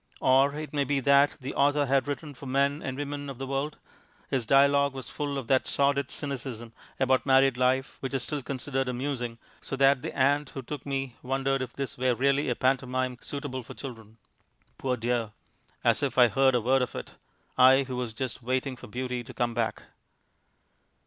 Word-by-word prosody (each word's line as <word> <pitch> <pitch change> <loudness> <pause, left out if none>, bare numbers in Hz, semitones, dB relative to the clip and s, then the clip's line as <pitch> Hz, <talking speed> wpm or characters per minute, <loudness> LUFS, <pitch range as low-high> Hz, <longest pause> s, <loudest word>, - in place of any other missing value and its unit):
Or 135 +2 +4
it 155 0 -6
may 145 -1 +2
be 140 +1 0
that 140 +2 +4
the 130 +2 -5
author 145 +1 +3
had 135 +1 +2
written 145 +1 -4
for 135 +1 -10
men 140 +3 +1
and 135 -1 -4
women 145 0 -4
of 135 - -7
the 135 - -4
world; 135 +3 -2 0.5
his 125 -4 0
dialogue 140 +1 +4
was 130 - -7
full 145 -1 -3
of 135 - -4
that 130 +2 +2
sordid 140 0 +1
cynicism 125 -5 -5 0.3
about 130 -1 +3
married 135 -1 +4
life 130 +1 +1
which 135 0 -3
is 130 - +1
still 150 +1 -3
considered 135 0 -2
amusing, 125 -2 -3 0.2
so - - -4
that 135 -1 +4
the - - -6
aunt 140 +1 +2
who 135 - -7
took 145 +2 -7
me 135 -3 -3
wondered 135 +1 0
if 125 -2 -5
this 135 -4 -5
were 125 -1 +2
really 140 +4 +2
a - - +1
pantomime 130 -1 0
suitable 140 -2 -5
for 115 - -11
children. 115 -5 -9 0.6
Poor 130 -2 -1
dear! 115 -2 -1 0.5
as - - +3
if - - -1
I 125 -2 +7
heard 135 +1 +3
a 120 - +2
word 130 +4 +3
of 125 - -3
it, - - -7 0.4
I 130 +1 +6
who 130 -1 -5
was 125 -2 -3
just 130 +2 -4
waiting 130 +2 -1
for - - -11
Beauty 125 +2 -3
to - - -12
come 120 -1 0
back. 115 -2 -2
135 Hz, 195 wpm, -28 LUFS, 125-140 Hz, 0.6 s, I